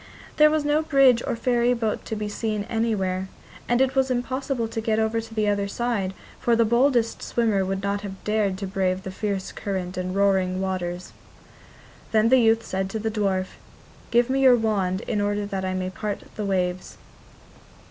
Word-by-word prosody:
There 305 0 +7
was 305 -1 0
no 295 +1 +2
bridge 275 -6 +4
or - - 0
ferryboat 240 -2 0
to 220 - -4
be 210 0 -3
seen 210 0 -2
anywhere, 200 -5 -1 0.4
and 240 +1 +3
it 265 0 +2
was 265 -1 +2
impossible 255 -1 -1
to 225 0 -4
get 220 -1 0
over 220 +1 +1
to 225 0 -12
the 215 -1 +1
other 200 -1 +1
side, 200 -4 -2 0.2
for 235 - +2
the 230 0 +3
boldest 235 0 +2
swimmer 220 -5 +1
would 190 +1 -3
not 200 0 -1
have 195 -2 -8
dared 210 -3 0
to 195 - -4
brave 190 -1 -1
the 190 - -5
fierce 195 -1 -3
current 185 -2 -4
and 185 0 -3
roaring 190 -2 +2
waters. 180 -2 -3 1.0
Then 220 +1 +4
the 260 +1 +6
youth 225 -1 +3
said 190 0 -2
to 220 - -3
the 220 +1 -2
dwarf: 195 -3 -1 0.5
'Give 240 0 +3
me 270 +1 0
your 260 -2 +7
wand 200 -5 0
in 210 - -2
order 205 0 0
that 195 -1 -4
I 185 0 -2
may 185 0 -2
part 205 +3 -4
the 210 - -3
waves. 180 -2 -2
210 Hz, 190 wpm, -24 LUFS, 190-235 Hz, 1.0 s, There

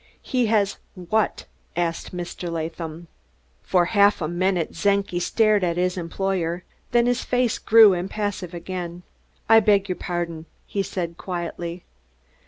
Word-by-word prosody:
"He 250 -3 +1
has 210 -2 +2 0.2
what?" 200 +4 -1 0.3
asked 170 -1 -2
Mr. 175 -1 -5
Latham. 165 0 -5 0.5
For 180 -2 +2
half 205 +1 +4
a 155 - -1
minute 175 0 0
Czenki 200 0 +1
stared 215 +1 +2
at 170 -1 0
his 180 0 +1
employer; 180 0 -2 0.3
then 240 -1 +3
his 245 0 +1
face 250 -2 +1
grew 220 -3 +7
impassive 185 -1 -3
again. 175 0 -6 0.4
"I 225 0 +8
beg 205 -2 +3
your 185 - 0
pardon," 170 -2 -4 0.2
he 200 - -2
said 170 -3 -4
quietly. 175 -1 -5
180 Hz, 135 wpm, -23 LUFS, 170-205 Hz, 0.5 s, I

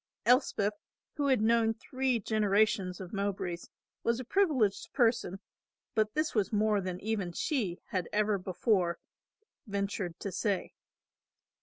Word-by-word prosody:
Elspeth 230 -4 +3 0.4
who 285 -1 +1
had 260 -6 +3
known 225 0 +3
three 255 +1 -1
generations 205 -3 +1
of 185 0 -8
Mowbrays 195 -4 -3 0.3
was 235 +1 +1
a - - -4
privileged 275 - +1
person, 230 -6 +2 0.5
but 215 +3 +1
this 310 +1 0
was 210 -4 +1
more 210 -1 +2
than 185 -1 -4
even 205 -4 -1
she 200 - -1
had 185 -3 -2
ever 210 -1 +2
before 185 -1 +1 0.7
ventured 200 -3 -3
to 200 - -4
say. 195 +1 -1
210 Hz, 130 wpm, -31 LUFS, 190-230 Hz, 0.7 s, Elspeth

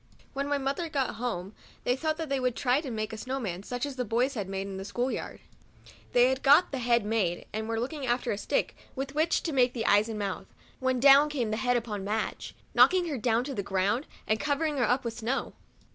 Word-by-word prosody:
Whem 275 +1 -2
my 285 0 +1
mother 280 +5 -2
got 270 -7 -1
home, 200 -5 -3 0.3
they 245 - +2
thought 310 +3 -1
that 325 -1 -4
they 275 -1 0
would 250 -2 0
try 250 0 +2
and 275 -6 -4
make 215 0 -3
a 220 - -6
snow 260 +4 -3
man, 190 -7 -4
such 245 +5 -3
as 280 -2 -6
the 250 - 0
boys 245 +4 +1
had 205 -7 -4
made 195 0 -3
in 195 -1 -6
the 190 - -5
school 245 +6 -2
yard. - - -5 0.2
52 - - -36
MEMOIRS - - -24
OF - - -18
A - - -26
They 245 +1 +6
had 265 0 -1
got 290 +6 +6
the 275 - -2
head 235 -3 +2
made, 205 -6 0
and 220 +1 -3
were 225 0 -1
looking 270 +3 -3
after 245 0 0
a 205 - -1
stick - - -1 0.2
with 275 +1 -4
which 315 +3 +1
to 320 - -2
make 250 -2 +3
the 230 -3 -3
eyes 205 +2 +4
and 220 - -4
mouth, 200 -2 -3 0.3
when 260 -2 +1
down 280 +3 +7
came 250 -7 -2
the 215 - -1
head 245 +1 +2
upon 215 -4 -4
Madge, 215 +2 -3 0.2
knocking 360 -2 +5
her 285 - -2
down 230 +1 +2
to 275 +1 -5
the 205 - -2
ground, 200 +7 0 0.2
and 215 0 +1
covering 300 0 0
her 240 -5 +2
up 250 +1 +1
with 230 -1 -4
snow. 245 +5 -2
245 Hz, 260 wpm, -28 LUFS, 220-275 Hz, 0.3 s, down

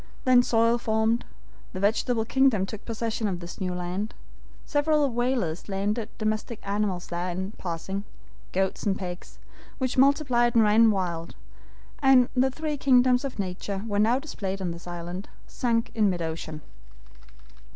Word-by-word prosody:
Then 255 -1 +6
soil 230 0 +3
formed. 220 +1 +1 0.5
The 185 - -4
vegetable 220 +3 +1
kingdom 260 -6 +3
took 210 +1 -8
possession 225 -1 -2
of 185 -3 -2
this 175 +3 -9
new 180 -1 -1
land. 180 +4 -3 0.5
Several 295 0 +2
whalers 235 -9 -1
landed 205 +3 -1
domestic 215 +1 -2
animals 200 -3 -1
there 175 +1 -3
in 190 +3 -3
passing; 190 +3 -4 0.5
goats 190 0 0
and 200 -1 0
pigs, 180 -2 -7 0.4
which 255 -1 -1
multiplied 260 -4 +3
and 230 - +6
ran 220 +2 +6
wild, 175 -5 -2 0.7
and 265 -3 +6
the 260 +1 +4
three 300 +2 -3
kingdoms 250 -2 +4
of 275 - -4
nature 195 +1 -4
were 205 -2 -1
now 225 +4 +4
displayed 200 -9 -4
on 180 -2 -2
this 170 +1 -9
island, 175 +3 -6 0.2
sunk 230 -2 -1
in 215 -3 +3
mid 175 -2 -2
ocean. 160 -1 -5
215 Hz, 150 wpm, -26 LUFS, 185-245 Hz, 0.7 s, Then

